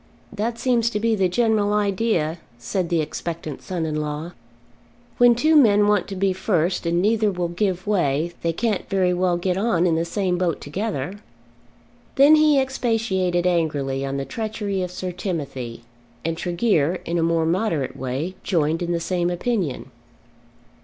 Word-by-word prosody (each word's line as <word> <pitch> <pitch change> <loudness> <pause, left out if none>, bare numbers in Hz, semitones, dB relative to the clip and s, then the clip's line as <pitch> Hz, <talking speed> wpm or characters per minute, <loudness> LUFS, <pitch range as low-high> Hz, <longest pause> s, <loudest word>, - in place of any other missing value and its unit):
"That 230 +3 -2
seems 235 -2 +2
to 210 - -2
be 230 +1 +1
the 190 -4 +2
general 215 0 +2
idea," 200 -6 0 0.2
said 170 +9 -2
the 170 -2 +2
expectant 160 -1 -5
son 175 -3 -3
in 155 -1 -2
law. 150 +3 -4 0.9
"When 245 -1 +7
two 310 +7 +3
men 210 -7 +5
want 205 -3 +2
to 195 - -6
be 190 0 +1
first 185 -2 0
and 170 +1 +1
neither 215 0 +2
will 175 -2 -2
give 185 0 -1
way, 170 -5 0
they 165 - 0
can't 210 +3 -2
very 185 -2 +2
well 180 -1 +1
get 180 +1 -1
on 195 -5 +2
in 170 - +3
the 165 +1 +1
same 180 0 -1
boat 175 -3 0
together." 190 +1 -4 1.0
Then 280 +3 +7
he 305 -2 +5
expatiated 225 -9 0
angrily 145 -6 0
on 135 0 -3
the 135 - -3
treachery 215 -2 -3
of 180 - -2
Sir 180 0 -5
Timothy, 140 - -5 0.4
and 165 0 0
Tregear 175 -2 +1
in 170 0 -1
a - - +2
more 165 0 +2
moderate 165 - 0
way 135 +8 -3
joined 165 -2 0
in 175 0 -1
the 170 - 0
same 175 +1 -1
opinion. 180 - -2
180 Hz, 165 wpm, -22 LUFS, 165-210 Hz, 1.0 s, When